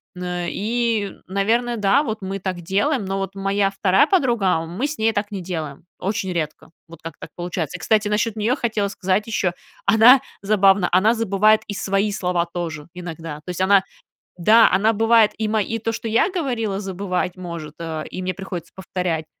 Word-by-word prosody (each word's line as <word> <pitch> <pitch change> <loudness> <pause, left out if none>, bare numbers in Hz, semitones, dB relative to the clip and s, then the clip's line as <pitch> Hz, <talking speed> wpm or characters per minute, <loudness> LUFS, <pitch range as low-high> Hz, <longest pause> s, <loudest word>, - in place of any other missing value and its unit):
Мн 180 -1 -3
и, 225 -1 -1
наверное, 230 +5 0
да, 215 +8 +3
вот 220 -5 -4
мы 195 +1 -4
так 185 -2 -4
делаем, 205 - 0
но 195 +1 -2
вот 195 0 -4
моя 195 0 0
2 195 +2 +3
подруга. 235 - +2
Мы 185 +11 -3
с 300 0 -6
ней 220 +1 +3
так 205 0 -2
не 195 -2 -4
делаем. 160 -6 -5 0.2
Очень 195 0 -2
редко. 155 -3 -4 0.2
Вот, 165 -1 -13
как 165 -2 -8
так - - -10
получается. 175 -3 -4
Кстати, 215 -1 +2
насчет 210 +1 0
нее 220 +4 +1
хотела 220 -6 -1
сказать 190 +2 0
еще. 190 -5 0 0.3
Она 225 +6 +7 0.2
забавно. 195 -2 +4
Она 210 +6 +4
забывает 215 -1 +3
и 205 - -4
свои 195 +1 0
слова 180 -3 0
тоже. 165 -4 -5
Иногда. 165 -3 -7
То - - -9
есть, 180 0 -3
она 195 +1 +5 0.6
да, 220 +6 +6
она 200 +4 +3
бывает 225 0 +4
и 220 - -1
ма 215 0 +1
и 225 +3 -3
то, 225 +1 -2
что 230 - -5
я 230 - +3
говорила, 240 - -2
забывать 185 -2 -3
может, 170 -4 -7
э, 160 -2 -4
и 185 - -6
мне 185 0 -2
приходится 180 -3 -7
повторять. 180 -4 -3
195 Hz, 185 wpm, -21 LUFS, 180-220 Hz, 0.6 s, Она